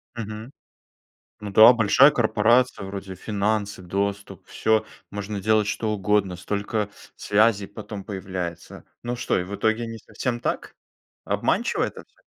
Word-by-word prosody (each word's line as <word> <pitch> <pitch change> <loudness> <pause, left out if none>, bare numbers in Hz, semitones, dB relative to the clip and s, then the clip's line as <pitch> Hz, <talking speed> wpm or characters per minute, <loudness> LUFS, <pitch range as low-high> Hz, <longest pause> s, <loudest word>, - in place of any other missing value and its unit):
Мгм. 110 +2 -6 0.9
Ну 105 -1 -6
да, 110 +4 +9
большая 120 +5 +6
корпорация: 115 -1 +2
вроде 95 -1 -6
финансы, 105 0 -2
доступ, 100 +2 -3
всё, 110 0 +1 0.3
можно 100 0 -5
делать 110 0 +2
что 110 +1 -1
угодно, 100 -2 +1
столько 105 +3 -2 0.3
связей 105 -1 +2
потом 105 -1 -8
появляется. 95 -4 -6 0.2
Ну 120 +1 -3
что, - - 0
и 90 - -2
в 100 +3 -7
итоге 110 +2 0
не 115 0 -7
совсем 120 +2 -4
так? - - -3 0.5
Обманчиво - - 0
это - - -6
всё? - - -33
105 Hz, 135 wpm, -24 LUFS, 100-110 Hz, 0.9 s, да